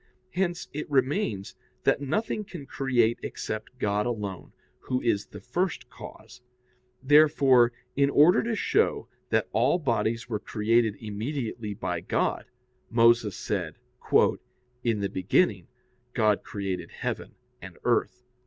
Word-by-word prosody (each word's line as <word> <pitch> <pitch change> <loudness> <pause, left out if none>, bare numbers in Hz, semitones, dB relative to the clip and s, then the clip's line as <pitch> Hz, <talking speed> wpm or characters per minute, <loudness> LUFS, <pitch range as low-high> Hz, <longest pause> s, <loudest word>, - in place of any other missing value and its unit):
Hence 175 -1 -1
it 150 +1 -5
remains 130 - 0 0.3
that - - +2
nothing 210 +9 -1
can 170 -7 -9
create 120 -5 +1
except 110 +4 -6
God 105 -2 0
alone, 105 -6 -4 0.3
Who 125 -1 -2
is 105 -5 0
the 105 - -10
first 175 - -2
cause. - - -12 0.6
Therefore, 140 -4 +5 0.2
in 140 0 +3
order 150 +5 +6
to 230 0 -1
show 435 - +1 0.2
that - - +1
all - - +3
bodies 115 -6 -1
were 110 -3 -2
created 110 0 +1
immediately 110 0 -4
by 90 -5 -3
God, - - -1 0.4
Moses 115 -3 +4
said: - - -3 1.1
"In 115 -4 0
the 100 - +1
beginning 95 - +1 0.5
God 105 -3 +2
created 95 -4 -4
heaven - - -5 0.3
and - - -10
earth." 125 - 0
120 Hz, 125 wpm, -27 LUFS, 105-145 Hz, 1.1 s, order